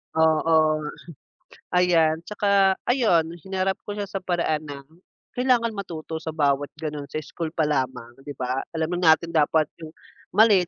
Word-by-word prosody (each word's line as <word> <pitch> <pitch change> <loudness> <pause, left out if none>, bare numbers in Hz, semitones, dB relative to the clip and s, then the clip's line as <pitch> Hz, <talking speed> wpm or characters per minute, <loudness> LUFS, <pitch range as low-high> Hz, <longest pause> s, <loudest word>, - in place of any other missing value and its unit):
Oo 160 -1 +3
nga. 150 0 -5 0.9
Ayan 165 -3 +3
tsaka 200 0 +2
ayun 180 -11 +2
hinarap 190 +2 -2
ko 205 - -4
siya 205 - -2
sa 195 -1 -5
paraan 170 -4 0
na 140 -1 -8 0.5
kailangan 245 -2 +2
matuto 165 -5 -6
sa 160 -1 -6
bawat 145 -1 +1
ganoon, 150 -2 -5
sa - - -7
school 165 +2 -5
pa 160 - +2
lamang, 130 -5 -2
'di 145 +1 -9
ba? 130 +1 -2 0.2
Alam 165 +2 -1
na 160 -3 +7
natin 170 0 -9
dapat 155 0 +3 0.2
yung 160 - -7 0.5
mali 215 -3 +6
160 Hz, 155 wpm, -24 LUFS, 155-190 Hz, 0.9 s, na